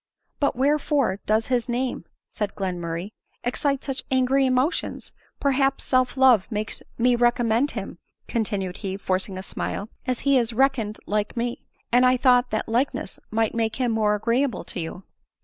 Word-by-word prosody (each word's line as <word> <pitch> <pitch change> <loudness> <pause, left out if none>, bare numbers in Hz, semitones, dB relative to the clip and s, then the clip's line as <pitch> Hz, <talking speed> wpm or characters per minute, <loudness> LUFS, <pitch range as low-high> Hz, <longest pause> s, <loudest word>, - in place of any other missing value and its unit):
" - - -49
But 285 - +1
wherefore 275 -5 +1
does 220 +1 +2
his 245 0 0
name," 250 +1 -2 0.2
said 210 -3 -4
Glenmurray, 180 0 -3 0.2
" - - -43
excite 275 +3 0
such 270 -2 -3
angry 265 +1 +3
emotion? 255 +6 0 0.4
Perhaps 275 -1 +1
self 255 0 +1
love 250 -6 +5
makes 215 0 -3 0.2
me 245 +1 +4
recommend 240 +2 +2
him," 195 -4 -6 0.3
continued 200 -5 -2
he, 195 -2 -4
forcing 190 0 -2
a 185 - -5
smile, 205 +1 -4
" - - -40
as 255 -2 -1
he 280 -2 +4
is 235 -1 -1
reckoned 235 -4 +1
like 210 +3 -1
me, 240 +1 -3 0.2
and 245 +1 +5
I 255 0 +5
thought 250 -1 +4
that 215 - -2
likeness 240 -3 -1
might 220 0 +1
make 225 -1 0
him 250 -2 0
more 215 -2 +2
agreeable 235 +2 0
to - - -7
you." 170 +3 -6
240 Hz, 170 wpm, -24 LUFS, 210-260 Hz, 0.4 s, love